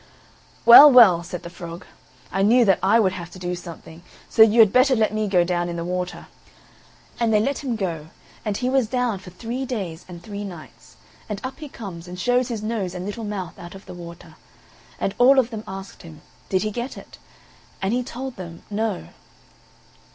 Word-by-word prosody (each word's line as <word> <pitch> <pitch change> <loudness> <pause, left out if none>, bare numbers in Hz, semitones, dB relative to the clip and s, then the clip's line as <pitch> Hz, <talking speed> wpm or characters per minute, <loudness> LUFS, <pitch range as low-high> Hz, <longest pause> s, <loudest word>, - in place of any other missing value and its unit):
"Well, 240 +6 +11
well," 215 -10 +7
said 175 0 -7
the 170 - -7
frog, 170 -1 -9 0.5
"I 195 - -1
knew 235 +4 +5
that 195 -3 +3
I 200 +4 +4
would 195 -4 +3
have 175 -2 -7
to 180 - -13
do 180 -1 -4
something, 170 -1 -10 0.3
so 225 - +2
you 220 +1 +6
had 215 -3 +7
better 255 +1 +4
let 220 -2 +1
me 215 0 -1
go 180 -3 +3
down 175 0 -1
in 170 - -4
the 170 0 -4
water." 180 0 -4 0.9
And 230 -1 +1
they 215 - +4
let 275 +7 -1
him 250 -4 -2
go, 170 -7 -4 0.4
and 210 -2 -2
he 250 - -2
was 260 -3 +2
down 245 -4 -1
for 185 - -12
three 235 +8 -5
days 195 -10 -5
and 175 -1 -11
three 205 0 -6
nights; 175 -6 -11 0.3
and 210 -2 -4
up 260 +3 -6
he 300 -2 -8
comes, 180 -9 -9
and 180 0 -8
shows 245 +4 +1
his 225 -4 -5
nose 210 -5 -3
and 180 0 -5
little 205 +3 -5
mouth 195 -5 -6
out 175 +2 -10
of 195 - -13
the - - -10
water; 170 -1 -11 0.6
and 195 - -1
all 265 +3 +6
of 250 -2 +2
them 220 -1 -6
asked 195 +1 -9
him, 160 -3 -13 0.3
Did 185 0 +1
he 215 - -2
get 240 +4 -5
it? - - -13 0.6
and 195 +3 -1
he 250 - +1
told 255 +1 -7
them, 170 -3 -9
No. 205 - -2
200 Hz, 210 wpm, -22 LUFS, 175-235 Hz, 0.9 s, Well